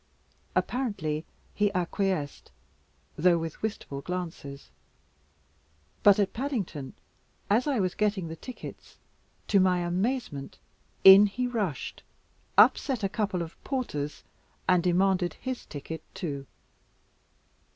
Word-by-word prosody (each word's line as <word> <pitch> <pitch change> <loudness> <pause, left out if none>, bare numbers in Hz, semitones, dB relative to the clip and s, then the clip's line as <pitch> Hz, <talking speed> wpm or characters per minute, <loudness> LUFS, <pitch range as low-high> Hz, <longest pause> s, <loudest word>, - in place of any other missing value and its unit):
Apparently 170 - -1 0.3
he 205 -1 +2
acquiesced, 180 -4 -1 0.7
though 175 +2 +4
with 165 -1 -5
wistful 205 -10 -4
glances; 165 -5 -6 1.3
but 205 -1 +7
at 200 -2 +1
Paddington, 220 - -3 0.6
as 235 +7 +3
I 275 -5 +1
was 185 -2 +1
getting 205 -4 0
the 160 - -6
tickets, 250 +9 -10 0.5
to 200 - +4
my 185 -1 +3
amazement 180 - -2 0.5
in 195 +2 +10
he 250 +5 -2
rushed, 210 - -3 0.6
upset 255 -6 +5
a 195 - +1
couple 195 -4 -1
of 165 - -11
porters, 150 - -3 0.4
and 180 -1 +5
demanded 180 -1 +2
his 260 -1 -5
ticket 155 +2 -6
too. 140 -6 -4
185 Hz, 110 wpm, -28 LUFS, 160-215 Hz, 1.3 s, in